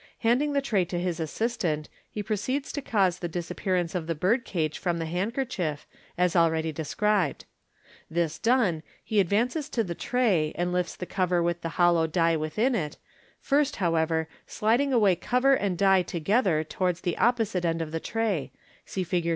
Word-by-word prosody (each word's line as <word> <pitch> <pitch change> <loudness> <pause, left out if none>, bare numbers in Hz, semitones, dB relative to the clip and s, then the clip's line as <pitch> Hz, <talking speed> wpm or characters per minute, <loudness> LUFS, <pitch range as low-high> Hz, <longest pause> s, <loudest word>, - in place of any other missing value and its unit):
Handing 250 +6 +2
the 280 -1 +1
tray 215 -9 +2
to 175 0 -3
his 175 -2 -2
assistant, 165 -3 -2 0.2
he 210 - -5
proceeds 230 +7 -2
to 285 - -4
cause 190 -8 +1
the 175 - -3
disappearance 175 +1 -2
of 175 -4 -3
the 165 - -1
birdcage 180 - 0
from 175 -2 -1
the 165 - -3
handkerchief, 180 - -2 0.3
as 180 -1 +2
ahead) 160 -2 +2
described. 180 +2 0 0.6
This 165 -1 -1
done, 225 -10 +2 0.2
he 215 - +1
advances 240 - +1
to 235 -7 0
the 175 -4 -4
tray, 190 -8 +1
and 175 0 -1
lifts 180 -1 -1
the 180 - -6
cover 180 -2 0
with 170 0 -1
the 165 0 -5
hollow 175 -2 +4
die 165 0 +2
within 160 - 0
it, 155 -10 -2 0.4
first, 285 0 +1
however, 160 -2 +1 0.2
sliding 240 +6 +1
away 210 -7 +4
cover 250 +8 +2
and 200 -8 0
die 195 0 +5
together 175 -1 +1
towards 180 +3 -2
the 175 - -1
opposite 225 -7 +1
end 165 -1 0
of 160 -2 -4
the 165 - -2
tray 210 -7 -2 0.4
(see 190 - -2
Fig. 175 -1 -1
180 Hz, 170 wpm, -27 LUFS, 165-225 Hz, 0.6 s, die